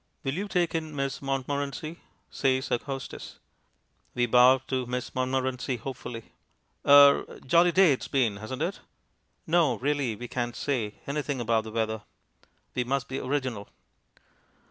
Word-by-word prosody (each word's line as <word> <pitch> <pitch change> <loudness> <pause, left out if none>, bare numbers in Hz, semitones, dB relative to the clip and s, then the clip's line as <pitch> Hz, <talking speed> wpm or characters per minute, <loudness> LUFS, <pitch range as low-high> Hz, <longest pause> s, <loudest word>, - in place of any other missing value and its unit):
"Will 135 - -1
you 195 +6 -3
take 180 -4 0
in 160 -2 -3
Miss 135 -1 -2
Montmorency?" 140 +3 -3 0.3
says 130 -1 0
our 120 - +2
hostess. 135 0 -7 0.8
We 120 -1 +2
bow 125 +2 +6
to 130 -2 -2
Miss 125 0 -4
Montmorency 130 0 -1
hopefully. 120 -2 -7 0.5
"Er 140 0 +6
jolly 170 +6 +5
day 185 -4 +5
it's 130 - -5
been, 120 -7 +1
hasn't 125 +7 -4
it?" 180 +4 -3 0.7
No, 160 -6 +3
really, 135 -1 -1
we 120 +4 -7
can't 120 -1 -3
say 120 -7 -2
anything 140 -1 -2
about 115 -2 +1
the 110 - -7
weather. 110 -1 -1 0.7
We 125 - 0
must 130 0 -1
be 135 +1 -3
original. 130 -6 -3
130 Hz, 145 wpm, -27 LUFS, 120-145 Hz, 0.8 s, bow